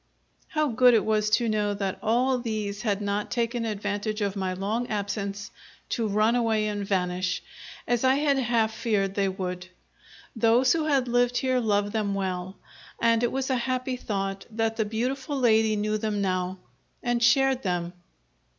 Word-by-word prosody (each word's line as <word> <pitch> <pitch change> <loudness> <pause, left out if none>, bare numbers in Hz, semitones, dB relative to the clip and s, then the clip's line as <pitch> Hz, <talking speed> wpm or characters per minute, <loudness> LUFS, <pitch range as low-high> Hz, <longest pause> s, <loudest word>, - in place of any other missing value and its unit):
How 305 -1 0
good 245 +1 +5
it 220 - +2
was 215 -1 +1
to 230 +2 +2
know 210 -2 0
that 195 -1 -3
all 250 +3 +2
these 215 -3 -3
had 210 -3 -1
not 205 +1 -2
taken 235 -1 -1
advantage 210 0 -2
of 200 -1 -1
my 190 -2 -1
long 210 +6 -2
absence 205 0 -3 0.4
to 230 -3 -1
run 215 +3 +2
away 225 -3 +1
and 205 -1 -2
vanish, 180 -2 -1 0.4
as 240 0 +1
I 260 0 +4
had 285 -1 +2
half 230 -3 +1
feared 205 -4 0
they 195 -1 +1
would. 180 -1 -5 0.7
Those 235 +3 +4
who 320 -2 0
have 275 -4 +2
lived 245 +1 +2
here 255 -1 +1
love 205 -3 +1
them 205 -2 -1
well; 185 -1 -3 0.4
and 230 0 +3
it 240 - +1
was 265 0 -2
a - - +2
happy 255 +1 -2
thought 195 -4 -4
that 225 0 -1
the 220 - 0
beautiful 255 +6 -2
lady 220 -3 +3
knew 215 +1 -1
them 210 -1 -1
now, 185 -1 -1 0.5
and 240 -1 0
shared 265 +2 +4
them. 175 -3 -2
220 Hz, 170 wpm, -26 LUFS, 200-240 Hz, 0.7 s, good